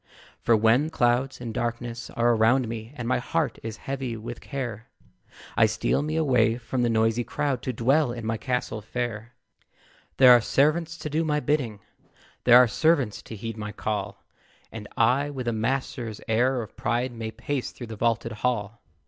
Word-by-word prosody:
For 115 Hz, -2 st, +3 dB
when 115 Hz, +8 st, +3 dB
clouds 125 Hz, -2 st, +1 dB
and 120 Hz, -2 st, -5 dB
darkness 120 Hz, 0 st, -3 dB
are 120 Hz, 0 st, +2 dB
round 120 Hz, +3 st, +3 dB
me, 115 Hz, 0 st, -6 dB
And 120 Hz, -3 st, -5 dB
my 125 Hz, -, +2 dB
heart 145 Hz, -1 st, -1 dB
is 115 Hz, -1 st, -6 dB
heavy 130 Hz, -4 st, -3 dB
with 120 Hz, +2 st, -7 dB
care, 120 Hz, -5 st, -5 dB, 0.7 s
I 110 Hz, -, +5 dB
steal 110 Hz, +5 st, 0 dB
me 155 Hz, +1 st, -2 dB
away 125 Hz, -8 st, +3 dB
from 125 Hz, +1 st, -3 dB
the 120 Hz, -, +2 dB
noisy 115 Hz, +1 st, +2 dB
crowd, 135 Hz, 0 st, -2 dB
To 130 Hz, -, -2 dB
dwell 130 Hz, +4 st, +2 dB
in 120 Hz, -2 st, -6 dB
my 110 Hz, 0 st, 0 dB
castle 125 Hz, -1 st, -2 dB
fair. 115 Hz, +1 st, -5 dB, 0.8 s
There 130 Hz, -2 st, +8 dB
are 120 Hz, -1 st, +8 dB
servants 155 Hz, +7 st, +1 dB
to 150 Hz, -, -5 dB
do 160 Hz, +2 st, +1 dB
my 150 Hz, -2 st, +1 dB
bidding; 125 Hz, -7 st, -1 dB, 0.6 s
There 120 Hz, 0 st, +9 dB
are 125 Hz, 0 st, +7 dB
servants 140 Hz, -4 st, +1 dB
to 110 Hz, -, -9 dB
heed 115 Hz, +1 st, -6 dB
my 105 Hz, -1 st, -5 dB
call; 105 Hz, -1 st, -4 dB, 0.5 s
And -, -, -8 dB
I, 140 Hz, +3 st, +3 dB
with 130 Hz, -4 st, -5 dB
a 120 Hz, -, +1 dB
master's 115 Hz, -1 st, -2 dB
air 120 Hz, +2 st, +2 dB
of 110 Hz, -, -13 dB
pride, 120 Hz, +2 st, -1 dB
May 115 Hz, -2 st, -5 dB
pace 125 Hz, +4 st, -3 dB
through 120 Hz, -, -9 dB
the 115 Hz, -1 st, -8 dB
vaulted 115 Hz, +1 st, 0 dB
hall. 110 Hz, -1 st, -2 dB
120 Hz, 180 wpm, -26 LUFS, 110-130 Hz, 0.8 s, There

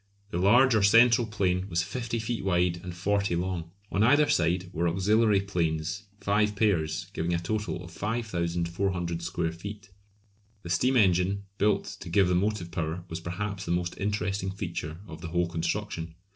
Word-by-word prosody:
The 85 Hz, -, -1 dB
large 120 Hz, +7 st, +5 dB
or 110 Hz, -, +3 dB
central 115 Hz, +3 st, +6 dB
plane 95 Hz, -3 st, 0 dB
was 85 Hz, 0 st, +1 dB
50 115 Hz, +5 st, -3 dB
feet 115 Hz, +1 st, -3 dB
wide 90 Hz, -2 st, +2 dB
and 90 Hz, -1 st, -7 dB
40 100 Hz, 0 st, 0 dB
long; 85 Hz, -1 st, -2 dB, 0.2 s
on 100 Hz, -, +1 dB
either 145 Hz, +6 st, +5 dB
side 90 Hz, -, +1 dB
were 85 Hz, +2 st, 0 dB
auxiliary 100 Hz, +4 st, +3 dB
planes, 85 Hz, 0 st, -2 dB
five 105 Hz, +1 st, +1 dB
pairs; 85 Hz, -8 st, +1 dB
giving 85 Hz, +2 st, -1 dB
a -, -, +1 dB
total 105 Hz, +5 st, -2 dB
area 90 Hz, 0 st, -7 dB
of 90 Hz, -, -11 dB
5400 85 Hz, -4 st, -2 dB
square 85 Hz, -1 st, -2 dB
feet. 100 Hz, +5 st, -9 dB, 0.7 s
The 85 Hz, -, -5 dB
steam 125 Hz, +8 st, +3 dB
engine 95 Hz, -1 st, +3 dB, 0.2 s
built 100 Hz, 0 st, +2 dB
to 90 Hz, -, -8 dB
give 95 Hz, +1 st, +3 dB
the -, -, +2 dB
motive 90 Hz, -1 st, 0 dB
power 85 Hz, 0 st, -3 dB
was 80 Hz, -, -4 dB
perhaps 95 Hz, +3 st, -4 dB
the 85 Hz, -, -3 dB
most 90 Hz, 0 st, -1 dB
interesting 100 Hz, -1 st, -1 dB
feature 85 Hz, -5 st, -5 dB
of 80 Hz, -6 st, -10 dB
the 85 Hz, -, -5 dB
whole 85 Hz, +1 st, 0 dB
construction. 85 Hz, 0 st, -3 dB
95 Hz, 170 wpm, -28 LUFS, 85-105 Hz, 0.7 s, central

